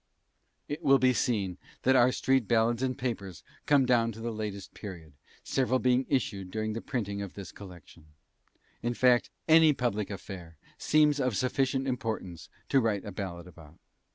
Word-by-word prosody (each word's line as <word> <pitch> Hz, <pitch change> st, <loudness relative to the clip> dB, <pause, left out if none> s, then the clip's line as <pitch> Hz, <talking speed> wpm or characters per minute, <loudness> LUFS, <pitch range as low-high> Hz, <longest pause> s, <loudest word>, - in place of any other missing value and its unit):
It 150 Hz, +3 st, -5 dB
will 135 Hz, -3 st, +5 dB
be 130 Hz, 0 st, +3 dB
seen 100 Hz, -7 st, -1 dB, 0.2 s
that 130 Hz, -, +4 dB
our 125 Hz, 0 st, +5 dB
street 130 Hz, -3 st, +1 dB
ballads 115 Hz, +1 st, +2 dB
and 130 Hz, -1 st, -1 dB
"papers" 105 Hz, -8 st, -4 dB, 0.2 s
come 140 Hz, -2 st, +5 dB
down 120 Hz, -2 st, +3 dB
to 110 Hz, -, -11 dB
the 115 Hz, +1 st, -3 dB
latest 105 Hz, -3 st, -6 dB
period, 85 Hz, -7 st, -9 dB, 0.3 s
several 130 Hz, -1 st, +1 dB
being 125 Hz, 0 st, +2 dB
issued 100 Hz, -8 st, -1 dB
during 110 Hz, +2 st, -3 dB
the 115 Hz, -, -4 dB
printing 100 Hz, -6 st, -3 dB
of 100 Hz, -2 st, -7 dB
this 100 Hz, -2 st, -8 dB
collection; 90 Hz, -4 st, -13 dB, 0.7 s
in 120 Hz, 0 st, -2 dB
fact, 125 Hz, -1 st, +3 dB, 0.2 s
any 160 Hz, -1 st, +7 dB
public 105 Hz, -6 st, -2 dB
affair 90 Hz, -5 st, -8 dB, 0.2 s
seems 150 Hz, -1 st, +3 dB
of 125 Hz, -6 st, 0 dB
sufficient 130 Hz, +3 st, 0 dB
importance 110 Hz, -, -4 dB, 0.2 s
to 135 Hz, -, +4 dB
write 105 Hz, -4 st, -1 dB
a 105 Hz, -, -6 dB
ballad 90 Hz, -3 st, -6 dB
about. 80 Hz, -3 st, -15 dB
115 Hz, 165 wpm, -29 LUFS, 100-130 Hz, 0.7 s, any